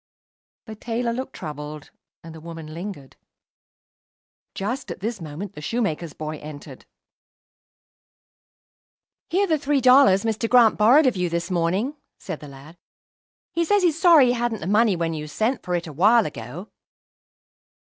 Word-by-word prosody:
The 220 - -8
tailor 235 +2 -3
looked 260 +2 -5
troubled, 150 -2 -8 0.3
and 165 -1 -10
the 160 - -11
woman 165 -1 -9
lingered. 170 -6 -8 1.4
Just 240 +8 -4
at - - -6
this 215 0 -4
moment 165 +5 -7
the 150 - -10
shoemaker's 170 -4 -2
boy 155 0 -6
entered. 150 -1 -11 2.4
"Here 380 +4 +2
are - - 0
the 315 -3 +1
three 280 0 +1
dollars 255 -6 +5
Mr. 225 0 -1
Grant 240 -3 +5
borrowed 250 +9 +5
of 255 - +2
you 180 -1 0
this 170 +2 -3
morning," 185 - -1 0.2
said 155 - -7
the 150 - -11
lad. 140 +5 -14 0.7
"He 335 - +1
says 405 +3 +2
he's 330 -2 +1
sorry 335 -7 +7
he 245 - +2
hadn't 240 -3 -2
the - - -5
money 210 +1 +3
when 165 -1 -2
you 150 -1 -5
sent 220 - -1
for 180 -2 -2
it 170 0 -2
awhile 200 +9 +3
ago." 145 - -8
200 Hz, 155 wpm, -23 LUFS, 160-245 Hz, 2.4 s, sorry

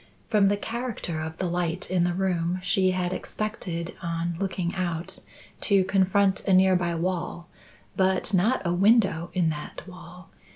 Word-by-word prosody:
From 210 -3 +4
the 205 +1 +2
character 225 -8 -4
of 160 +1 -5
the 185 - -2
light 175 +1 -2
in 180 -2 +2
the 175 0 0
room, 180 -2 0
she 190 -1 +2
had 185 -1 -1
expected, 180 -6 -4
on 170 0 -2
looking 185 -2 -2
out, 175 -3 -2 0.4
to 200 -2 +4
confront 190 +1 +2
a 195 - +4
near 185 0 +5
by 175 -1 0
wall, 175 0 -3 0.5
but 190 +1 +1
not 195 +5 +2
a 170 - +1
window 190 -3 +3
in 170 -3 +2
that 150 +4 -7
wall. 180 -1 -12
185 Hz, 160 wpm, -26 LUFS, 170-195 Hz, 0.5 s, near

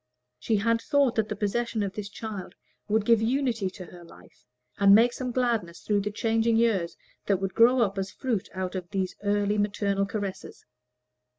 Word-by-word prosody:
She 220 - 0
had 230 +3 +1
thought 280 -3 +2
that 220 -3 -1
the 210 - -3
possession 220 +2 -1
of 195 -1 -3
this 205 -1 -6
child 205 -4 -7 0.3
would 215 0 +1
give 230 -1 +4
unity 230 -4 0
to 185 0 -10
her 175 0 -13
life, 165 - -18 0.3
and 200 0 +7
make 235 +3 +5
some 255 -1 -4
gladness 230 -10 -1
through 205 -1 0
the 205 - -2
changing 225 +1 +1
years 210 -7 +1 0.3
that 200 - +3
would 195 -1 -3
grow 235 0 +5
as 195 0 -4
fruit 235 -5 -3
out 185 -1 -3
of 180 -2 -5
these 190 -2 -2
early 205 0 +1
maternal 200 -1 0
caresses. 200 -2 -6
210 Hz, 180 wpm, -27 LUFS, 195-230 Hz, 0.3 s, and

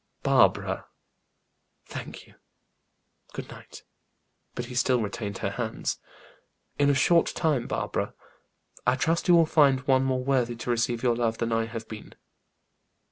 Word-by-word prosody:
"Barbara!" - - +2 1.0
"Thank - - -8
you. - - -21 1.0
Good - - -7
night." - - -12 0.7
But 120 - -4
he 125 - -9
still 125 0 +2
retained 105 -2 -4
her 100 - -2
hands. 110 +1 -3 0.8
"In 145 0 +4
a 140 - +3
short 170 +5 +4
time, 150 -8 0
Barbara, - - -3 0.7
I - - +4
trust 165 +5 0
you 175 - +7
will 165 -1 +6
find 140 -5 +4
one 130 0 +3
more 130 -1 0
worthy 125 -3 +1
to 115 +1 -3
receive 120 0 0
your 120 -2 +3
love 115 -1 0
than 115 0 -2
I 115 0 +1
have 115 -1 -7
been." 110 -1 -10
125 Hz, 145 wpm, -27 LUFS, 115-140 Hz, 1.0 s, you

